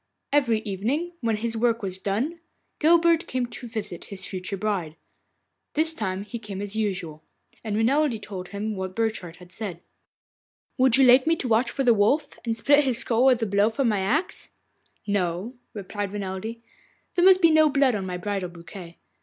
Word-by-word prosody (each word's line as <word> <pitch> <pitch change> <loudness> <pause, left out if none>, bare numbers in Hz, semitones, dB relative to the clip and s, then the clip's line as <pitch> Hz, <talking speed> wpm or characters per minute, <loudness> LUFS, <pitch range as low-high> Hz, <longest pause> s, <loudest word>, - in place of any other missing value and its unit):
Every 235 -7 +3
evening, 230 - -2
when 225 -2 +1
his 230 +1 -3
work 230 0 +1
was 190 -1 -3
done, 240 - -2 0.4
Guilbert 335 +1 +4
came 255 -1 -1
to 240 +1 -9
visit 210 -6 -6
his 190 -1 -7
future 185 +1 -4
bride. 185 -6 -2 0.8
This 320 +2 +1
evening 190 -6 -3
he 235 +3 -7
came 205 -3 -7
as 205 +1 -5
usual, 180 -8 -3 0.4
and 215 -2 -3
Renelde 250 +2 +2
told 190 -3 -7
him 205 +3 -4
what 190 -1 -5
Burchard 220 -7 -2
had 180 0 -16
said. 185 -4 -6 1.0
'Would 260 -1 +6
you 270 - +6
like 255 +3 +6
me 330 - +4
to 275 - -4
watch 230 +1 +2
for 270 - -2
the 240 -2 +5
Wolf, 270 +8 +1
and 230 -1 -1
split 285 +5 +5
his 260 -4 +2
skull 235 +1 +1
with 250 -3 +4
a - - +2
blow 200 +1 +2
from 235 +2 0
my 210 -2 +1
axe?' 265 - -1 0.6
'No,' 195 +2 -1 0.2
replied 205 0 -5
Renelde, 205 +3 -5 0.5
'there 350 - +2
must 375 -1 +7
be 335 -3 +5
no 310 -1 +5
blood 275 -3 +3
on 195 -3 -3
my 180 -1 -3
bridal 195 -1 -3
bouquet. 170 0 -11
220 Hz, 185 wpm, -25 LUFS, 195-260 Hz, 1.0 s, must